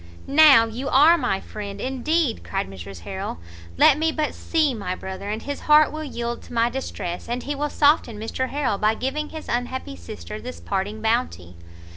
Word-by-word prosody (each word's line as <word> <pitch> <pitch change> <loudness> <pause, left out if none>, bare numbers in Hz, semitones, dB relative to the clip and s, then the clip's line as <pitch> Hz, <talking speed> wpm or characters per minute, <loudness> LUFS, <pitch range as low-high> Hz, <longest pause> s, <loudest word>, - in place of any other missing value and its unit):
"Now 280 -5 +7
you 245 +5 -4
are 300 +6 +7
my 195 - 0
friend 200 -1 -7
indeed!" 265 +3 0
cried 195 0 -3
Mrs 95 -1 -9
Harrel, 85 - -5 0.4
"let 280 - +6
me 320 0 +2
but 305 -2 -1
see 310 -5 +1
my 200 -5 -3
brother, 190 +2 -7
and 215 +2 -3
his 285 0 -4
heart 300 0 +5
will 310 0 -5
yield 235 -4 -4
to - - -13
my 235 0 +2
distress, 205 -8 -5
and 245 +1 -2
he 290 - -2
will 295 +1 -2
soften 290 -8 +2
Mr 225 +4 -3
Harrel 265 -8 -1
by 215 +1 +2
giving 290 +6 -3
his 315 -1 -8
unhappy 245 - -3
sister 85 +3 -8
this 85 - -7
parting 195 - -3
bounty." 220 - -1
240 Hz, 185 wpm, -23 LUFS, 200-290 Hz, 0.4 s, Now